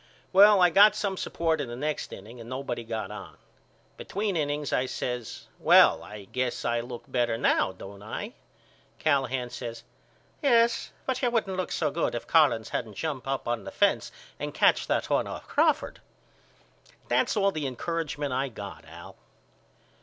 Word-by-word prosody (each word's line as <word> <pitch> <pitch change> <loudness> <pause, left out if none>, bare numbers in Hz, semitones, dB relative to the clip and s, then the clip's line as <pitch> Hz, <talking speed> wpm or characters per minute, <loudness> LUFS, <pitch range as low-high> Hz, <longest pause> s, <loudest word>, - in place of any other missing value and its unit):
Well 205 +1 +8
I 175 - +5
got 205 +4 +7
some 200 -2 -1
support 165 -4 -1
in 140 - -4
the 120 - -6
next 150 +4 -3
inning 110 +5 -10
and 115 - -10
nobody 130 -2 -4
got 110 -3 -4
on. 105 - -9 0.6
Between 200 -1 -2
innings 145 -2 -1
I 130 - +1
says 125 -2 -4
Well - - +6
I 105 -1 -9
guess 125 +3 -2
I 120 0 +1
look 120 0 -7
better 120 -2 0
now 115 - +2
don't 100 +1 -11
I? 105 - -6 0.6
Callahan 130 -4 0
says 115 -2 -7 0.6
Yes 235 -5 +3 0.2
but 260 - -1
you 250 - +2
wouldn't 220 -5 0
look 185 0 -3
so 155 -3 0
good 160 -4 -1
if 120 - -4
Collins 140 -9 +3
hadn't 110 -4 -4
jumped 145 -2 -4
up 135 0 -2
on 120 -1 -1
the - - -6
fence - - +1 0.3
and - - -5
catched - - +3
that - - 0
one - - +1
off - - -7
Crawford. - - +1 1.1
That's 125 - +1
all 200 -1 +3
the 155 -5 -3
encouragement 145 +1 -3
I 135 +2 0
got 100 -4 -9
Al. - - -12
135 Hz, 170 wpm, -27 LUFS, 120-170 Hz, 1.1 s, Well